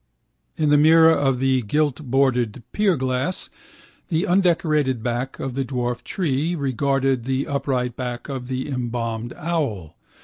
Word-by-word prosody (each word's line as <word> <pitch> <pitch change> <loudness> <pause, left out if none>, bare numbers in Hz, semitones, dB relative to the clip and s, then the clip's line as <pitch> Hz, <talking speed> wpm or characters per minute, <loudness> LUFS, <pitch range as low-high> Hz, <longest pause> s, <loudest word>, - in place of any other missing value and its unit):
In 155 -2 +1
the 145 0 +5
mirror 160 +1 +7
of 135 -4 +1
the 130 0 +2
giltbordered 130 -3 0
pierglass 140 -6 0 0.6
the 165 +1 0
undecorated 155 - +2
back 120 +3 -2
of 135 - -4
the 135 +1 -1
dwarf 125 -2 -3
tree 165 -1 -1
regarded 135 -3 0
the 135 +1 -1
upright 130 -3 -1
back 125 -2 -5
of 130 -3 -5
the 130 +1 -3
embalmed 120 -3 -3
owl. 140 - -2
135 Hz, 130 wpm, -22 LUFS, 125-150 Hz, 0.6 s, mirror